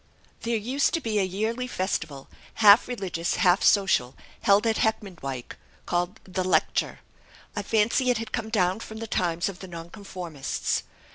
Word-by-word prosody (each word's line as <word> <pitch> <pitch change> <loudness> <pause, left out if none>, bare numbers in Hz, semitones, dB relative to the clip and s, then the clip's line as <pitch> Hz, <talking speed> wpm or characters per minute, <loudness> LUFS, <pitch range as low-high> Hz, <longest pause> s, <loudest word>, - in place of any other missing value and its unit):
"There 230 0 0
used 255 +9 +1
to - - 0
be 220 -7 -1
a - - +3
yearly 220 +7 -2
festival, 165 - -3 0.3
half 210 0 +7
religious, 185 -8 -2
half 180 +1 +4
social, 180 -11 +3 0.3
held 200 +2 +4
at 225 -1 +2
Heckmondwike, 170 - -2 0.3
called 175 +3 -1
'The 185 0 -3
Lecture.' 185 - +1 0.5
I 205 - -1
fancy 225 +5 +2
it 245 - +3
had 225 0 -5
come 225 -2 -3
down 185 -2 +1
from 220 -1 -8
the 225 - -5
times 175 -5 0
of 190 -3 -6
the 190 - -8
Nonconformists. 170 -3 -4
200 Hz, 155 wpm, -26 LUFS, 175-220 Hz, 0.5 s, half